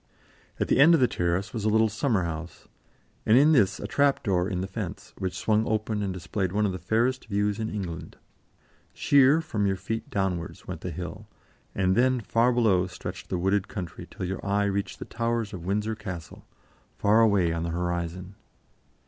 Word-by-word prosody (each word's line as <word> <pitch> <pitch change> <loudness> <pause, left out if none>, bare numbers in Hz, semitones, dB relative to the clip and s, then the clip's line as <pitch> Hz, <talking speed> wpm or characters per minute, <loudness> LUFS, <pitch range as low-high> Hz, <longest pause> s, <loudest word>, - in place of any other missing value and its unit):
At - - 0
the - - +2
end 165 +5 +8
of - - +2
the 125 - +4
terrace 90 +2 -1
was 110 -4 -3
a 110 - +2
little 110 +1 +4
summer 110 -2 0
house, 85 0 -6 0.6
and 110 - +5
in 145 +4 +6
this 100 -9 +3
a - - -5
trap 140 +6 +2
door 90 -2 +1
in 90 -3 -2
the - - -2
fence, 95 - -6
which 95 -1 -3
swung 110 +3 +1
open 110 -1 -1
and 100 -2 -1
displayed 90 +1 -3
one 105 +2 +1
of 100 - +1
the 90 - -5
fairest 120 +7 0
views 105 0 0
in 110 0 -2
England. 90 -6 -6 0.8
Sheer 140 +3 +5
from 105 -10 -1
your 95 - +1
feet 115 +4 -5
downwards 95 -6 -3
went - - -6
the - - -4
hill, - - -7 0.5
and 95 -1 +2
then 130 +2 +3
far 115 +3 +2
below 105 -7 +3
stretched 90 - -8
the 90 - -1
wooded 95 +2 +1
country 90 -5 -7
till 95 - -5
your 95 +1 -4
eye 100 0 +1
reached 100 0 -2
the - - -7
towers 115 -2 -2
of 85 -2 -7
Windsor 105 +3 0
Castle, 95 -7 -8 0.5
far 105 +3 +4
away 100 -7 +3
on 85 - -2
the 85 - -2
horizon. 90 +2 -3
100 Hz, 195 wpm, -27 LUFS, 90-110 Hz, 0.8 s, end